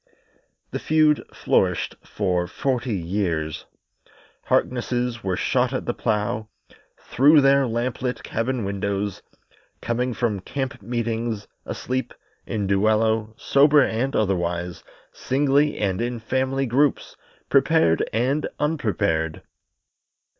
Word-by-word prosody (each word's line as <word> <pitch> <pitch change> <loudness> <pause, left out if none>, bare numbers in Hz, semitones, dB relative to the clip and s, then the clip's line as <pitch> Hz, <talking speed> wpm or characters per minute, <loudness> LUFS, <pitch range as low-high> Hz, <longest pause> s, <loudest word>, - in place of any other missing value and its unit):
The - - -3
feud 155 -1 +3
flourished - - 0
for 90 -3 -1
forty 125 -2 -1
years. 85 -4 -2 0.8
Harknesses 120 -1 0
were 95 -1 0
shot 125 0 +1
at 130 - -2
the 120 - -1
plough, 105 -1 -1 0.5
through 145 +4 +5
their 135 -1 +4
lamp 120 +3 -2
lit 125 -1 -2
cabin 115 0 -2
windows, 100 0 -2 0.6
coming 120 +1 -1
from 110 -5 0
camp 130 +4 -4
meeting, 115 0 -2 0.3
asleep, 130 -1 -3 0.3
in 105 -2 -2
duello, 110 +2 +1
sober 145 +1 +5
and 130 +3 -1
otherwise, 90 -3 -1 0.3
singly 145 +2 +1
and 95 -1 -1
in 120 0 -2
family 130 +4 -1
groups, 135 +4 +1 0.3
prepared 80 0 +3
and 130 +7 0
unprepared. 100 - -1
115 Hz, 105 wpm, -23 LUFS, 100-130 Hz, 0.8 s, through